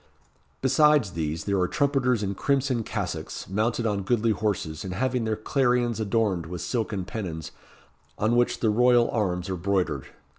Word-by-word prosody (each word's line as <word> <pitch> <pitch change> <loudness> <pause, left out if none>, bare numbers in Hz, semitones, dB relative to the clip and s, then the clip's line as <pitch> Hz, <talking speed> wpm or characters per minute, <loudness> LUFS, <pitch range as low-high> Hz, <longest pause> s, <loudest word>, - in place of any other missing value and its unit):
Besides 150 - +4
these, 80 -1 -3
there 100 -1 0
are 90 - +2
trumpeters 135 -5 +1
in 100 0 -1
crimson 135 +2 0
cassocks, - - -4
mounted 110 +4 0
on 105 -3 0
goodly 115 +3 +1
horses, 100 -8 -2
and 90 -2 -5
having 125 +2 0
their 110 0 0
clarions 120 0 +1
adorned 100 -5 0
with 90 0 -6
silken 110 -6 -2
pennons, 85 -7 -5 0.7
on 110 +3 +1
which 120 0 +1
the 110 - +3
royal 120 +1 +4
arms 90 -5 -1
are 95 - -2
broidered. 95 +1 -1
110 Hz, 155 wpm, -26 LUFS, 95-120 Hz, 0.7 s, Besides